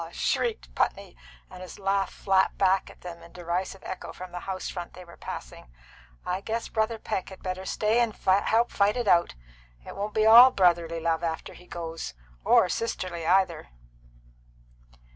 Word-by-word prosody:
shrieked - - -1
Putney, - - -1 0.4
and 180 - -10
his 185 - -9
laugh 195 -1 0
flapped 190 -1 +1
back 190 -1 +2
at - - -16
them 175 -1 -9
in 170 - -15
derisive 180 +2 -4
echo 185 - -6
from 185 0 -10
the 175 - -5
house 185 -1 -3
front 175 -2 -6
they 180 - -11
were 170 - -14
passing. - - -8 0.6
"I 185 +2 -2
guess 225 +2 -3
Brother 220 +1 0
Peck 210 -3 -4
had 190 - -13
better 185 0 -4
stay 215 +4 +1
and 235 -3 +1
help 215 +5 +2
fight 205 +3 +2
it 240 -3 -2
out. 170 - +3 0.5
It - - -9
won't 205 +2 -4
be 215 0 +3
all 235 +4 +10
brotherly 170 -6 +2
love 165 0 -1
after 165 -1 -3
he 180 - -16
goes 165 - -6 0.3
or - - +5
sisterly 180 -5 -3
either." 180 - +2
185 Hz, 170 wpm, -27 LUFS, 170-205 Hz, 0.6 s, all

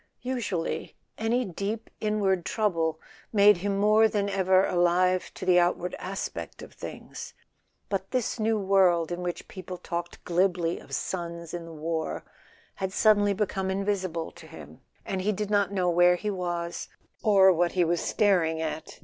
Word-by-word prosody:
Usually 230 -10 -3 0.2
any 235 +3 +1
deep 200 +4 -4
inward 200 -4 +1
trouble 165 -8 0 0.3
made 205 -2 +6
him 195 +2 -1
more 215 +2 +5
than 205 -2 -1
ever 190 -1 +3
alive 180 +1 +2
to - - -6
the 180 -1 +5
outward 175 0 0
aspect 190 +1 -5
of - - -12
things; - - -9 0.5
but 195 -1 -3
this 250 -1 -1
new 220 0 +2
world 190 -4 +3
in 175 +1 -3
which 175 -1 -4
people 185 -1 -8
talked 170 0 -5
glibly 175 -1 +1
of - - -6
sons 170 -2 -4
in 170 -1 -5
the 165 - -10
war 160 0 -3 0.5
had 190 -1 -2
suddenly 205 -1 +4
become 195 -2 -1
invisible 190 -4 -2
to - - -14
him, - - -12 0.2
and 190 -1 -2
he 205 +3 +1
did 210 0 -3
not 200 -2 +2
know 185 -3 0
where 175 +1 +5
he 210 +4 -3
was, 175 -2 -3 0.3
or 195 -3 +6
what 175 +1 +1
he 180 - +3
was 170 +1 0
staring 175 -6 +2
at. 160 -1 -5
185 Hz, 160 wpm, -27 LUFS, 175-205 Hz, 0.5 s, made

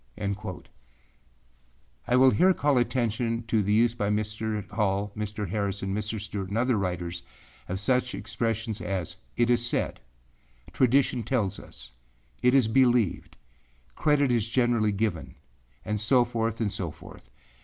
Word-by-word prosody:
â 100 -2 -4 1.4
I 125 - +3
will 130 +1 +6
here 185 +5 +4
call 145 -3 +2
attention 115 -1 -1
to 115 -1 +1
the 100 +1 -1
use 115 +2 +4
by 105 -4 -2
Mr. 105 0 -2
Hall, 100 -1 0
Mr. 105 -1 -4
Harrison, 100 0 -2
Mr. 105 +1 -2
Stewart, 100 -2 -5
and 100 - -2
other 125 +1 +2
writers 90 -3 -3 0.5
of 95 +1 -2
such 125 +4 +1
expressions 115 -1 -3
as 95 -3 -3 0.2
âIt 120 0 +3
is 120 -1 +3
said,â - - -5
âTradition 130 -1 +2
tells 105 -5 -1
us,â - - -6
âIt - - +2
is 130 -5 +5
believed,â 75 - -1
âCredit 145 -3 +3
is 115 -2 +1
generally 120 -4 +2
given,â 100 -5 -2 0.5
and 105 -1 -1
so 120 +3 +4
forth 115 -2 -2
and 110 -3 0
so 90 -4 -3
forth. 60 -4 -14
105 Hz, 145 wpm, -27 LUFS, 95-120 Hz, 1.4 s, will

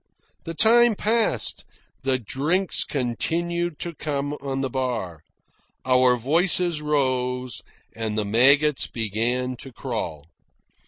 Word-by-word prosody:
The 165 - -5
time 235 +3 +6
passed, 215 - +1 0.4
the 135 -1 +1
drinks 150 - 0
continued 170 +6 -2
to 170 - -4
come 145 -2 -3
on 135 -1 -3
the 135 - -2
bar, 115 - -3 0.6
our 130 -1 +4
voices 165 +5 +1
rose, 130 -4 -1 0.3
and 110 -1 -3
the 105 - 0
maggots 140 +7 +3
began 120 +3 -2
to 135 - -10
crawl. 110 - -5
135 Hz, 110 wpm, -24 LUFS, 120-160 Hz, 0.6 s, time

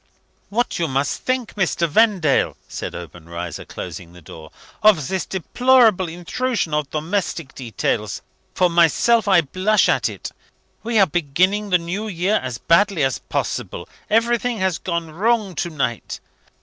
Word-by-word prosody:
"What 235 0 -1
must 140 -4 0
you - - -30
think, 255 -3 -1
Mr. 175 -3 0
Vendale," 185 -4 +2
said - - -6
Obenreizer, 85 -1 -7
closing 85 -1 -8
the 90 - -13
door, 80 0 -11 0.3
"of 185 -11 +4
this 190 -1 -2
deplorable 220 -1 +3
intrusion 180 +2 -2
of 150 -2 -1
domestic 165 -1 -3
details? 115 -6 -3 0.3
For 180 - +4
myself, 175 +7 +3
I 190 -3 +6
blush 185 +8 +2
at - - +2
it. - - -7 0.5
We 230 0 -1
are 195 - +7
beginning 185 +6 0
the 180 - +5
New 180 +6 -4
Year 195 +2 0
as 125 -3 -5
badly 170 - +3
as 135 -2 0
possible; - - -4 0.2
everything 235 +2 +1
has 185 -4 0
gone 170 -3 -3
wrong 210 +3 +1
to 175 - -1
night. 135 -7 -3
180 Hz, 145 wpm, -21 LUFS, 150-215 Hz, 0.5 s, are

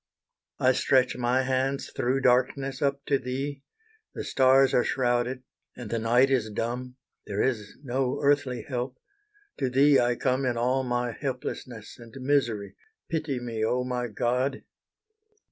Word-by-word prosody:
I 130 - +4
stretch 130 0 +2
my 125 +1 +1
hands 135 +1 -1
through 130 +2 0
darkness 130 +2 +1
up 140 -1 0
to 140 -2 +2
Thee, 135 +2 -4 0.5
The - - -4
stars 135 0 +4
are 120 - +4
shrouded, 125 0 0 0.3
and 120 -4 -7
the 115 - 0
night 120 +4 +3
is 120 -5 +1
dumb; 125 +4 -4 0.3
There 100 0 -1
is 110 -6 -2
no 130 +1 -1
earthly 140 -5 +1
help, 125 -1 -4 0.6
to 130 - 0
Thee 140 +2 +5
I 120 0 +2
come 130 +2 0
In 125 -2 0
all 125 +3 +1
my 120 -1 -1
helplessness 125 -4 -6
and 115 -1 -13
misery, 120 -7 0 0.4
Pity 155 -5 -1
me, 115 -3 -4
oh 125 +3 +1
my 125 -1 -2
God! 125 +5 -1
125 Hz, 145 wpm, -27 LUFS, 120-135 Hz, 0.6 s, Thee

